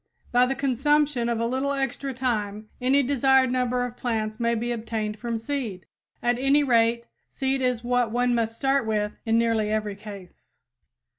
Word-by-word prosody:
By 245 +1 +4
the 270 - -1
consumption 275 -1 +1
of 235 -1 0
a 230 - 0
little 265 +4 -1
extra 270 0 -2
time, 215 -5 -2
any 270 +3 +3
desired 265 -1 +3
number 250 -1 0
of 245 -1 -7
plants 220 -2 -2
may 235 0 +1
be 240 +2 -2
obtained 220 -2 -3
from 235 -1 -2
seed. 225 -6 -4 0.4
At 240 0 +1
any 275 +2 +3
rate, 235 -2 +2 0.2
seed 265 0 -1
is 250 -2 0
what 245 -1 +1
one 245 +2 +1
must 230 -1 0
start 270 -1 +1
with 210 -1 0 0.2
in 225 0 +3
nearly 225 -2 +1
every 215 -2 -1
case. 200 -3 -12
240 Hz, 170 wpm, -25 LUFS, 225-265 Hz, 0.4 s, By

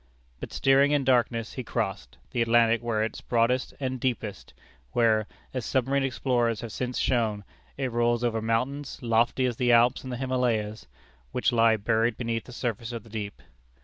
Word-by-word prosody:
But - - -7
steering 135 +2 +4
in 145 -2 +2
darkness, 120 -3 +1
he 130 - -5
crossed 95 - -3
the 120 - 0
Atlantic 115 0 +4
where 115 -2 0
it 110 - -2
is - - -9
broadest 120 +2 +1
and 130 -2 -2
deepest; 115 -5 -3 0.4
where, 110 -3 +3 0.3
as 130 -2 -3
submarine 135 +3 +1
explorers 120 -3 0
have 115 -2 -6
since 125 +2 -3
shown, 110 -5 0 0.3
it 135 -2 -2
rolls 120 0 +1
over 115 -2 0
mountains, 125 +6 -1
lofty 115 +2 +2
as 120 -2 -1
the 125 -1 +2
Alps 120 +4 +4
and 130 - -6
the 125 - -3
Himalayas, 120 - -1 0.4
which - - +1
lie 115 -1 +4
buried 110 +2 +1
beneath 115 -2 -2
the - - -11
surface 120 -2 -3
of 115 -3 -6
the 115 - -16
deep. 105 -2 -6
120 Hz, 180 wpm, -27 LUFS, 115-125 Hz, 0.4 s, steering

